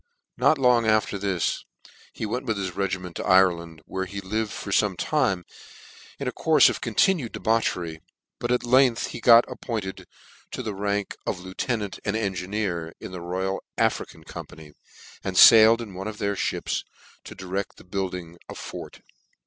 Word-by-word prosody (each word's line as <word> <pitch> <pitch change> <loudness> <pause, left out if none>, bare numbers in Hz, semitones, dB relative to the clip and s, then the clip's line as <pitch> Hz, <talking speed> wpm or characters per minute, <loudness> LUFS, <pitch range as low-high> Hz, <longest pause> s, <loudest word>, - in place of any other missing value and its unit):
Not 155 - +3
long 125 -4 +3
after 110 -2 +2
this 95 -4 -1 0.5
he - - -5
went 125 +5 -3
with 110 -2 0
his 95 -3 -4
regiment 95 -3 -3
to - - -4
Ireland, 85 -4 +2
where 95 0 -3
he 100 +2 -6
lived 105 +3 -2
for 100 - -6
fome 100 -1 +2
time 95 - 0 0.7
in - - -4
a - - 0
courle - - +1
of - - -4
continued 170 - +1
debauchery; 90 -8 -1 0.4
but 120 - -2
at 125 - +1
length 125 -1 +3
he 120 - -7
got 115 0 +7
appointed 105 -6 -5 0.5
to 130 - -4
the 110 -3 -3
rank 100 0 -2
of 90 - -2
lieutenant 100 +3 -3
and 105 0 -1
engineer 95 -4 -2
to - - -8
the 90 -1 -7
Royal 95 +2 -2 0.2
African - - -1
Company, 75 -1 -10 0.5
and 95 -1 -3
failed 115 +1 +8
in 105 -4 -10
one 95 +3 -6
of 110 -1 -6
their 100 -1 -1 0.2
mips - - -3 0.4
to - - -9
direct 95 +1 -4
the - - -14
building 90 -2 -5
a - - -7
fort. - - -8
100 Hz, 165 wpm, -25 LUFS, 90-110 Hz, 0.7 s, failed